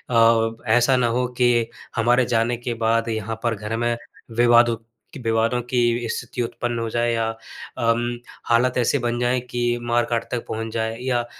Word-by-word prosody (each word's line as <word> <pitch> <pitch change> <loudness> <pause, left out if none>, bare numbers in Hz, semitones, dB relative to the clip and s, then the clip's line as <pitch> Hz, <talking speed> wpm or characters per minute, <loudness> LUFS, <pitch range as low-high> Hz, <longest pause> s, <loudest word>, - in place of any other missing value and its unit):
अब 115 0 +3
ऐसा 120 +3 +4
ना 125 -1 +2
हो 125 +2 0
कि 120 -2 +3 0.3
हमारे 120 +2 +3
जाने 120 +1 +1
के 120 0 -4
बाद 115 0 +1
यहाँ 110 0 -3
पर 115 -2 +1
घर 105 +2 -4
में 120 0 0 0.4
विवादु 120 0 +5 0.4
कि - - -8
विवादों 115 +2 +1
की 120 -1 +1
स्थिति 125 +2 -4
उत्पन्न 120 0 -3
हो 115 - -2
जाए 120 +1 0
या 115 -1 0 0.5
अम, 120 +1 0 0.3
हालात 120 +2 +2
ऐसे 120 -2 +2
बन 120 0 -1
जाएँ 125 +1 +1
कि 120 0 0
मार-काट 120 0 0
तक 120 -2 -3
पहुँच 110 0 -4
जाएँ 110 0 -2
या 120 -2 +1
120 Hz, 175 wpm, -22 LUFS, 115-120 Hz, 0.5 s, विवादु